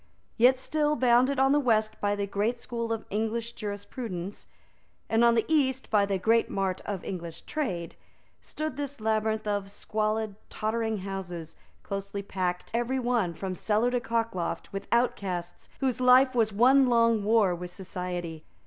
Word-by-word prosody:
Yet 250 Hz, +2 st, +5 dB
still, 300 Hz, +3 st, 0 dB
bounded 255 Hz, +1 st, +4 dB
on 270 Hz, +1 st, +4 dB
the 290 Hz, -, +4 dB
west 220 Hz, -5 st, +1 dB
by 205 Hz, 0 st, +1 dB
the 200 Hz, 0 st, -1 dB
great 210 Hz, +5 st, -1 dB
school 235 Hz, -1 st, -4 dB
of 225 Hz, -1 st, -2 dB
English 225 Hz, +2 st, -1 dB
jurisprudence, 205 Hz, -3 st, -6 dB, 0.6 s
and 225 Hz, +1 st, +3 dB
on 235 Hz, 0 st, +5 dB
the 225 Hz, -, +2 dB
east 265 Hz, -4 st, +1 dB
by 205 Hz, -2 st, +4 dB
the 195 Hz, -1 st, 0 dB
great 225 Hz, +4 st, +2 dB
mart 190 Hz, -2 st, -1 dB
of 200 Hz, -3 st, -3 dB
English 170 Hz, -3 st, -6 dB
trade, 185 Hz, -, -3 dB, 0.5 s
stood 310 Hz, -3 st, -5 dB
this 285 Hz, -2 st, -5 dB
labyrinth 220 Hz, 0 st, 0 dB
of 205 Hz, -1 st, -1 dB
squalid, 215 Hz, +1 st, -2 dB, 0.2 s
tottering 220 Hz, 0 st, -1 dB
houses, 175 Hz, -4 st, -6 dB, 0.3 s
close 195 Hz, 0 st, -4 dB, 0.2 s
packed, 180 Hz, -2 st, -2 dB
every 240 Hz, +3 st, 0 dB
one, 240 Hz, -9 st, 0 dB
from 190 Hz, +2 st, -4 dB
cellar 215 Hz, +6 st, +1 dB
to 245 Hz, -, +1 dB
cockloft, 230 Hz, -9 st, -2 dB
with 195 Hz, -, -5 dB
outcasts 190 Hz, -7 st, -1 dB
whose 255 Hz, -2 st, 0 dB
life 255 Hz, +1 st, +6 dB
was 225 Hz, -3 st, +2 dB
one 255 Hz, +6 st, +5 dB
long 230 Hz, -3 st, +3 dB
war 210 Hz, -3 st, +4 dB
with 175 Hz, +1 st, -6 dB
society. 175 Hz, -3 st, -5 dB
220 Hz, 160 wpm, -28 LUFS, 195-240 Hz, 0.6 s, life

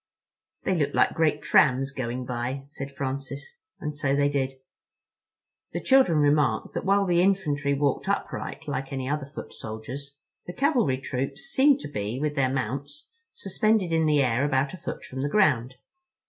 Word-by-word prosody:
"They -, -, +1 dB
look 155 Hz, -6 st, 0 dB
like -, -, +4 dB
great 155 Hz, -2 st, +1 dB
trams 135 Hz, -2 st, +4 dB
going 125 Hz, -1 st, -4 dB
by," 125 Hz, +2 st, -3 dB
said 140 Hz, -1 st, -7 dB
Francis. 140 Hz, -, -5 dB, 0.2 s
And 150 Hz, -1 st, -4 dB
so 140 Hz, -1 st, 0 dB
they 145 Hz, 0 st, +3 dB
did. 135 Hz, -2 st, -1 dB, 1.2 s
The -, -, -1 dB
children 260 Hz, -, +4 dB
remarked 145 Hz, -6 st, +2 dB
that -, -, -3 dB
while 200 Hz, +1 st, +3 dB
the 175 Hz, -2 st, +3 dB
infantry 150 Hz, -7 st, +1 dB
walked 140 Hz, -1 st, 0 dB
upright -, -, -3 dB
like 135 Hz, +1 st, -3 dB
any 130 Hz, -1 st, -3 dB
other 145 Hz, -1 st, -2 dB
foot 145 Hz, -, -9 dB
soldiers, 130 Hz, +6 st, -7 dB, 0.3 s
the 175 Hz, -, -5 dB
cavalry 245 Hz, -, +2 dB
troops 135 Hz, 0 st, -4 dB
seemed 275 Hz, 0 st, +3 dB
to -, -, -5 dB
be, 110 Hz, -1 st, -3 dB
with 150 Hz, 0 st, -1 dB
their 140 Hz, -3 st, +1 dB
mounts, 135 Hz, +3 st, -4 dB, 0.3 s
suspended 215 Hz, -, +1 dB
in 160 Hz, -1 st, +3 dB
the 150 Hz, -2 st, +4 dB
air 125 Hz, +1 st, +1 dB
about 140 Hz, +1 st, +1 dB
a -, -, -6 dB
foot 170 Hz, -, -6 dB
from 130 Hz, 0 st, -6 dB
the 145 Hz, -, -1 dB
ground. 130 Hz, -, +2 dB
140 Hz, 170 wpm, -26 LUFS, 130-160 Hz, 1.2 s, like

